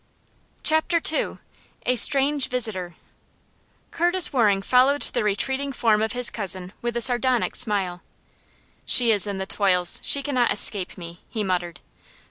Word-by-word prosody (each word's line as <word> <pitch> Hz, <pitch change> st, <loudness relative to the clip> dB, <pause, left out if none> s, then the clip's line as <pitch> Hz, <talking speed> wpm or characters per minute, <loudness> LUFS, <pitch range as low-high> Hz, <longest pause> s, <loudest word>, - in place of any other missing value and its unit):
Chapter 315 Hz, +2 st, +2 dB
II. -, -, -2 dB, 0.5 s
A 250 Hz, -, +1 dB
Stranger 275 Hz, +2 st, +2 dB
Visitor. 210 Hz, -9 st, -2 dB, 1.0 s
Curtis 350 Hz, 0 st, +1 dB
Waring 205 Hz, -6 st, +1 dB
followed 260 Hz, +5 st, +2 dB
the 240 Hz, -, -3 dB
retreating 265 Hz, +7 st, -2 dB
form 225 Hz, -4 st, +1 dB
of 220 Hz, 0 st, -2 dB
his 245 Hz, -1 st, -1 dB
cousin 190 Hz, -3 st, -3 dB
with 240 Hz, 0 st, -4 dB
a -, -, -1 dB
sardonic 250 Hz, 0 st, 0 dB
smile. 195 Hz, -6 st, -3 dB, 0.8 s
"She 240 Hz, -2 st, +4 dB
is 210 Hz, -1 st, +1 dB
in 200 Hz, -1 st, -4 dB
the 190 Hz, -, -4 dB
toils! 180 Hz, -3 st, +1 dB
She 280 Hz, -, 0 dB
cannot 255 Hz, -4 st, 0 dB
escape 200 Hz, -2 st, +4 dB
me!" 170 Hz, -1 st, -11 dB
he 215 Hz, -, -4 dB
muttered. 180 Hz, -2 st, -4 dB
225 Hz, 140 wpm, -22 LUFS, 195-260 Hz, 1.0 s, She